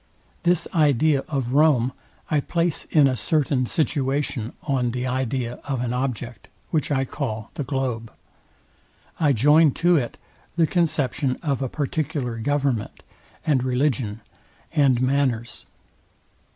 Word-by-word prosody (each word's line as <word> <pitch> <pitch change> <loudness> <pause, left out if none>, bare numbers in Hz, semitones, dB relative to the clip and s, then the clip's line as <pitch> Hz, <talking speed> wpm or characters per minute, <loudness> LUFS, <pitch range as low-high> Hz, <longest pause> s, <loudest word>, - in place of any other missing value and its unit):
This 175 -1 +2
idea 150 -2 +3
of 135 -4 -2
Rome 135 -4 +4 0.4
I 150 - +3
place 170 +2 -1
in 150 -3 +4
a 130 - +1
certain 135 0 +1
situation 140 -6 -1
on 130 -4 0
the 125 +1 -3
idea 125 -1 -2
of 135 -3 -2
an 120 0 -2
object, 125 -2 -4 0.2
which 155 -3 0
I 135 -1 +1
call 115 -6 -4
the 145 - -3
globe. 125 -4 -3 1.1
I 150 -3 +4
join 150 +6 +5
to 175 0 +3
it 120 -5 -2 0.4
the 165 -1 +4
conception 150 -6 0
of 140 -4 -1
a 130 - -1
particular 145 -4 -2
government, 135 -3 -1 0.4
and 140 -6 +2
religion, 125 -4 0 0.5
and 135 -5 +4
manners. 130 -4 0
135 Hz, 125 wpm, -23 LUFS, 125-150 Hz, 1.1 s, join